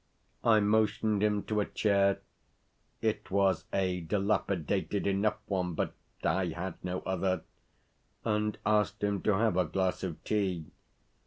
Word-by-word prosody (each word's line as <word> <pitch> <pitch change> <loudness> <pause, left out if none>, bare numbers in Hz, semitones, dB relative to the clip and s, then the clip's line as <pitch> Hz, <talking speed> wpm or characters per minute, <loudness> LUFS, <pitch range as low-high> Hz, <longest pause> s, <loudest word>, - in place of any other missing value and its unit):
I 110 -2 +6
motioned 105 0 +2
him 105 -1 +2
to 105 -1 -1
a 105 - +2
chair 100 -2 +2 0.8
(it 110 -1 0
was 95 -3 +2
a 95 -2 0
dilapidated 100 +1 0
enough 100 +2 +1
one, 90 -4 -1
but - - -1 0.3
I 95 -1 +2
had 90 0 -5
no 90 0 -2
other), 95 0 -1 0.8
and 105 -1 0
asked 105 -1 +2
him 100 -1 +1
to 105 - +2
have 105 -3 +2
a 90 - +3
glass 95 +3 0
of 90 -4 -5
tea. 95 -7 -1
100 Hz, 140 wpm, -31 LUFS, 95-105 Hz, 0.8 s, I